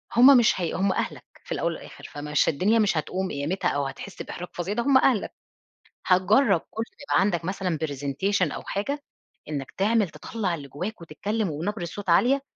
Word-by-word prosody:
هم 260 +2 +9
مش 225 -5 +3
هي 170 - -1
هم 190 +1 +1
أهلك - - -3 0.2
في - - -14
الأول - - -1
والآخِر، - - -11
فمش 150 0 0
الدنيا 205 +10 +2
مش 200 -6 +2
هتقوم 185 +4 -2
قيامتها 145 +7 -1
أو 140 -1 -1
هتحِس 190 +8 -7
بإحراج 175 0 -6
فظيع 175 +4 -3
ده 235 - 0
هم 275 -2 +5
أهلك. 255 -6 +2 0.7
هتجرّب 185 +9 +4
كل 225 - -2 0.3
ما - - +5
عندك 175 -4 0
مثلًا 185 -3 -1
presentation 145 +5 0
أو - - -5
حاجة، 280 +9 -3 0.5
إنّك 140 -3 -4
تعمل 210 -1 +2
تطلّع 190 -1 -3
اللي 140 -3 -9
جوّاك 180 - -5
وتتكلّم 200 +6 -2
وبنبرة 175 +5 -3
صوت 195 +2 -6
عالية، 260 +10 +4
190 Hz, 175 wpm, -26 LUFS, 160-215 Hz, 0.7 s, هم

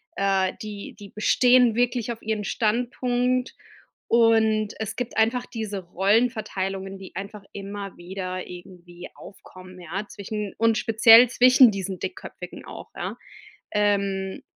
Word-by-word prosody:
äh, 195 -1 +1
die 205 -2 -8
die 200 -1 -11
bestehen 245 +2 +3
wirklich 240 -1 0
auf 230 - -8
ihren 215 -1 -2
Standpunkt, 245 +3 -1 0.5
und 220 -2 +3
es 220 -2 -4
gibt 245 -1 -5
einfach 235 +3 +2
diese 215 -4 -5
Rollenverteilungen, 195 0 -1
die 190 -1 -12
einfach 200 +1 -7
immer 200 0 -7
wieder 185 +1 -6
irgendwie 175 0 -11
aufkommen, 185 -1 -14
ja, 180 +4 -5
zwischen 205 0 -6
und 225 -1 +2
speziell 225 +2 +7
zwischen 255 +1 +6
diesen 190 -2 -5
Dickköpfigen 370 +2 -8
auch, - - -10
ja. - - -5 0.6
Ähm, 200 -2 0
210 Hz, 125 wpm, -24 LUFS, 195-230 Hz, 0.6 s, speziell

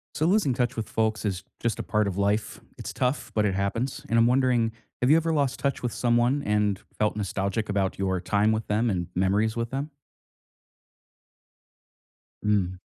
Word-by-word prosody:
So 155 - +1
losing 185 -6 +3
touch 125 0 -1
with 115 - -3
folks 110 -1 0
is 95 -3 -2 0.2
just 115 -1 -1
a - - -2
part 105 -1 +1
of 100 -1 -3
life, 100 +2 0 0.2
it's - - -6
tough, 125 +1 -1
but 105 -1 +2
it 100 - 0
happens, 105 +7 -2
and 115 - +3
I'm 115 - +6
wondering, 125 -3 +2 0.3
have 125 - +2
you 155 - +8
ever 165 0 +1
lost 140 -4 +1
touch 140 -1 -1
with 120 - -1
someone 120 +3 +2
and 105 -2 +1 0.2
felt 105 0 +1
nostalgic 100 +1 -2
about 100 -2 0
your 95 -2 0
time 105 +4 +2
with 110 0 -2
them 110 +3 +1
and 90 -3 -1
memories 100 +5 +1
with 115 0 -2
them? 140 +3 -3 2.5
Mm. 95 -3 +1
110 Hz, 180 wpm, -26 LUFS, 100-125 Hz, 2.5 s, you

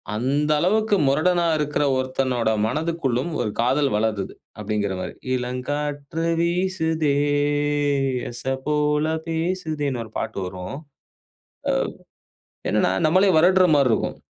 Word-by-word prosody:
"அந்த 140 +6 0
அளவுக்கு 210 +5 +2
முரடனா 170 +5 +2
இருக்கிற 150 -1 0
ஒருத்தனோட 130 -3 0 0.2
மனதிற்குள்ளும் 150 -1 -1
ஒரு 110 - -1
காதல் 135 +4 +2
வளருது" 105 -3 -1 0.3
அப்படிங்கிற 105 -1 -1
மாதிரி, - - -5 0.2
இளங்காற்று 145 +5 -3 0.2
வீசுதே, 170 -4 0 1.2
எச 120 - -9 0.2
போல 150 0 +1 0.2
பேசுதேன்னு 160 -6 -2
ஒரு 110 - -15
பாட்டு - - -4
வரும். 90 +6 -7 0.9
அ - - +4 1.0
என்னன்னா, - - +2 0.2
நம்மளே 185 +5 +4
வருடுற 185 +3 +5
மாதிரி 140 -3 +4
இருக்கும். - - -2
145 Hz, 105 wpm, -23 LUFS, 125-165 Hz, 1.2 s, வருடுற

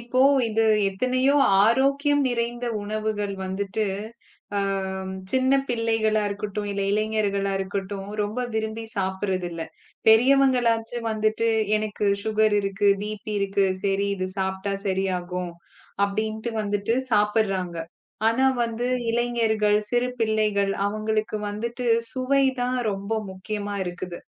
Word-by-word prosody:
இப்போ 245 +2 -1 0.3
இது 225 +1 +1 0.3
எத்தனையோ 255 +7 +1 0.3
ஆரோக்கியம் 275 +5 +3
நிறைந்த 240 0 -2 0.2
உணவுகள் 210 -1 -2
வந்துட்டு 195 +3 -2 0.7
அ - - +3 0.7
சின்னப் 265 +1 +2
பிள்ளைகளா 225 -2 +1
இருக்கட்டும், 205 0 -4
இல 200 - -3
இளைஞர்களா 205 -2 0
இருக்கட்டும் 195 0 -4
ரொம்ப 210 +4 -3
விரும்பி 220 +1 -2
சாப்பிடுறது 190 -1 -1
இல்ல. 165 -1 -5 0.5
பெரியவங்களாச்சு 240 -1 +4
வந்துட்டு 215 +1 +1 0.3
எனக்கு 215 -1 -2 0.2
சுகர் 215 -1 +2
இருக்கு, 200 +1 +1
பி.பி. 215 0 -5
இருக்கு. 200 0 +1 0.2
சரி 200 0 +1
இது 185 0 -2
சாப்பிட்டா 190 +1 -1
சரியாகும் 180 -2 -2 0.5
அப்படின்னு 220 +3 -2
வந்துட்டு 205 +1 0 0.2
சாப்பிடுறாங்க. 205 -4 +1 0.5
ஆனா 240 +4 +2 0.2
வந்து 230 +1 -3 0.2
இளைஞர்கள், 225 -3 +2
சிறு 245 0 +2
பிள்ளைகள் 215 -3 +1
அவங்களுக்கு 215 +1 -1
வந்துட்டு 235 +4 -4 0.3
சுவை 270 +1 +2 0.2
தான் 250 +1 0
ரொம்ப 200 +2 -5 0.2
முக்கியமா 205 +2 -4
இருக்குது. 175 0 -6
215 Hz, 110 wpm, -24 LUFS, 200-230 Hz, 0.7 s, பெரியவங்களாச்சு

